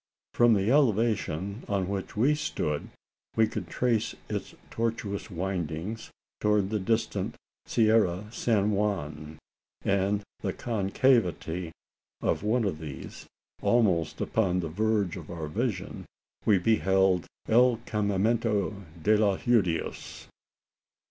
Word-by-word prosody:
From 120 -2 +5
the 100 +3 +1
elevation 110 - +1
on 100 -3 0
which 100 +1 -4
we 130 +7 +4
stood, 75 - -2 0.5
we 110 - +5
could - - -5
trace 115 -3 0
its - - -4 0.2
tortuous 115 -3 -2
windings, 90 +2 -3 0.3
towards 105 -2 +2
the 110 - 0
distant 110 +3 -1 0.3
Sierra 110 -3 +4 0.2
of 105 - -15
San 105 -4 +1
Juan; 80 -7 -2 0.5
and 100 +1 +1
in - - -19 0.2
the - - -2
concavity 95 -6 +1 0.5
of - - 0
one 110 +4 +1
of 95 -7 -1
these 75 -4 -8 0.3
almost 95 -10 +2
upon 90 -5 +1
the 80 - -4
verge 105 0 0
of 85 -4 -9
our 85 -3 -5
vision 105 +3 -3 0.4
we 105 - +5
beheld 95 -2 +2 0.2
"el 120 +1 +5
campamento 105 0 0 0.2
de 110 +1 +5
los 105 -2 +2
Judios." 100 -9 0
100 Hz, 120 wpm, -28 LUFS, 90-115 Hz, 0.5 s, From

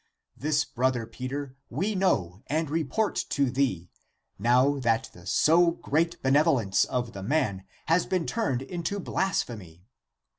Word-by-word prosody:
' - - -59
This, 150 0 0
brother 125 -2 0
Peter, 130 +4 -6
we 190 - -1
know 105 - 0
and 155 0 -1
report 165 +7 0
to 140 -3 +1
thee, 120 -10 -1 0.5
now 125 +6 +3
that 115 -3 0
the 90 +1 -14
so 170 +2 +4
great 165 0 -1
benevolence 135 - +3
of 125 -3 -3
the 100 - -7
man 100 -5 0 0.2
has 165 +3 +2
been 180 -3 0
turned 135 - -1
into 175 +7 -3
blasphemy. 105 - -3
135 Hz, 140 wpm, -27 LUFS, 115-165 Hz, 0.5 s, so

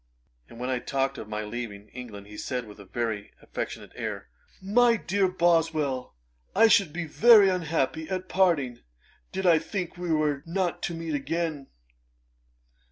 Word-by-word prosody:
And 115 - -12
when 125 +1 -2
I 125 - 0
talked 135 +2 -1
of 110 - -8
my 105 0 -3
leaving 105 -2 -6
England, 110 -5 -9
he 105 +1 -12
said 125 +2 -3
with 105 -1 -13
a 100 - -11
very 110 0 -3
affectionate - - -6
air, - - -5 0.3
'My 230 +4 +4
dear 195 -1 +1
Boswell, 165 - +1 0.4
I 225 +3 +7
should 200 -8 +4
be 175 +2 -3
very 210 +5 +7
unhappy 160 -3 -1
at 185 -1 -3
parting, 155 -12 +2 0.5
did 190 - -3
I 170 -3 +6
think 175 +2 -4
we 175 -1 -3
were 150 -3 +1
not 180 0 -1
to 170 - -5
meet 165 -1 -4
again.' 150 0 -2
160 Hz, 160 wpm, -27 LUFS, 125-180 Hz, 0.5 s, I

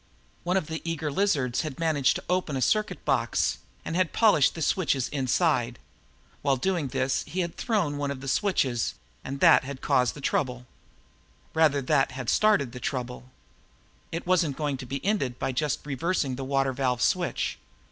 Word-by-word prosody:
One 180 +2 +1
of 190 - -1
the 160 +1 -5
eager 160 -3 -2
lizards 140 -8 +1
had 155 -5 -5
managed 155 -5 +2
to - - -5
open 180 -6 0
a - - -2
circuit 215 - 0
box - - +1 0.3
and 165 - -3
had 185 -2 +1
polished 205 - +4
the 165 - -6
switches 140 -7 +1
inside. 130 -3 +1 0.6
While 140 -1 +2
doing 170 +1 0
this, 130 +1 0
he 180 +5 -2
had 170 -1 -4
thrown 185 -11 0
one 145 -1 -1
of 140 -2 -4
the 135 - -8
switches 130 - 0 0.3
and 135 +1 -6
that - - +7
had 135 0 -7
caused 125 -3 +1
the - - -9
trouble. 125 -3 -1 0.9
Rather, 150 -3 +3
that 135 -1 +2
had 130 -3 -2
started 210 - +3
the 125 - -8
trouble. 125 0 -4 0.8
It 165 - -4
wasn't 170 -6 +2
going 145 -3 -1
to 130 -1 -8
be 135 +5 -5
ended 140 - 0
by - - -2
just 145 +2 -2
reversing 145 -1 -1
the 135 +1 -5
water 135 0 +1
valve 125 -2 0
switch. 180 -2 0
140 Hz, 175 wpm, -27 LUFS, 130-170 Hz, 0.9 s, that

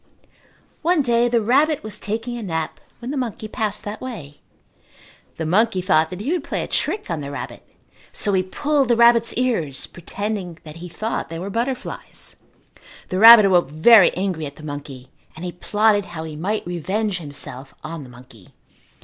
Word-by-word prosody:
One 335 -2 +2
day 240 -1 +3
the 235 -2 +1
rabbit 285 +6 +2
was 215 -1 -5
taking 225 +3 -3
a 240 - -5
nap 160 -6 -3 0.2
when 240 +2 -6
the 290 - -3
monkey 230 -4 -4
passed 215 -1 -2
that 210 +1 -6
way. 175 - -8 0.9
The 160 - -4
monkey 195 +4 +2
thought 175 -4 +2
that 180 +3 -7
he 265 +9 -2
would 350 -4 -1
play - - -3
a - - -6
trick 405 - -2
on 160 -3 -2
the 140 - -6
rabbit 140 - -7 0.5
so 205 - 0
he 190 - +3
pulled 280 +9 0
the 235 - +3
rabbit's 235 0 +5
ears, 200 - 0
pretending 190 0 -5
that 155 0 -10
he 175 +1 -8
thought 215 +3 -4
they 165 - -6
were 190 +4 -5
butterflies. 245 +4 -5 0.7
The 185 - -1
rabbit 225 -1 +10
awoke 180 -6 +3
very 185 +7 +6
angry 180 -5 -2
at 140 - -11
the 155 - -14
monkey 140 -3 -8 0.2
and 165 - -7
he 175 - -3
plotted 205 +3 +1
how 160 -3 -7
he 160 -1 -7
might 200 +8 -2
revenge 185 +3 -2
himself 140 -3 -8
on 160 0 -6
the 130 - -11
monkey. 120 -4 -16
195 Hz, 185 wpm, -21 LUFS, 160-230 Hz, 0.9 s, rabbit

